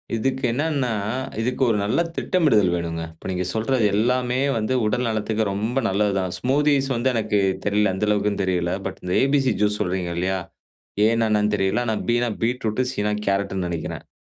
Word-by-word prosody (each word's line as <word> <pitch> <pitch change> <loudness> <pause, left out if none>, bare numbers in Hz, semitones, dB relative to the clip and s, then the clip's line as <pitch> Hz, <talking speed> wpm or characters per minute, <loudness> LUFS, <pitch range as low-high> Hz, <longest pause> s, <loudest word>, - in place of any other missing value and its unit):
இதுக்கு 130 +4 -1
என்னன்னா, 140 -2 0 0.5
இதுக்கு 125 +3 -2
ஒரு 110 - +2
நல்ல 105 +10 +1 0.2
திட்டமிடுதல் 120 - +2
வேணுங்க. 85 -1 -3
இப்போ 80 - -10
நீங்க 90 0 -2
சொல்றது 115 +2 +1
எல்லாமே 125 +3 +1 0.2
வந்து, 110 +3 -1
உடல் 125 +4 0
நலத்துக்கு 110 0 -1
ரொம்ப 110 +6 -2
நல்லது 100 +2 +1
தான். 95 -2 -1
ஸ்மூத்தீஸ் 140 +1 +2
வந்து 120 +3 +1
எனக்கு 110 -3 +1 0.3
தெரியல. 105 -1 +2
எந்த 105 +2 -1
அளவுக்குன்னு 105 -1 +1
தெரியல. 90 -2 0 0.2
பட் - - -7
இந்த 90 0 -2
ஏபிசி 135 -3 +2
ஜூஸ் 105 0 +1
சொல்றீங்க 90 -2 -1
இல்லையா 95 +2 0 0.6
ஏனா 115 +1 +3
என்னன்னு 105 0 +2
தெரியல. 95 +4 +1
ஆனா 110 - 0
பினா 120 +1 +2
பீட்ரூட். 115 -1 0
சினா 105 -2 -1 0.2
கேரட்டுன்னு 100 -2 0
நினைக்கிறேன். 85 -2 -4
இப்போ - - -64
110 Hz, 170 wpm, -23 LUFS, 100-125 Hz, 0.6 s, ஏனா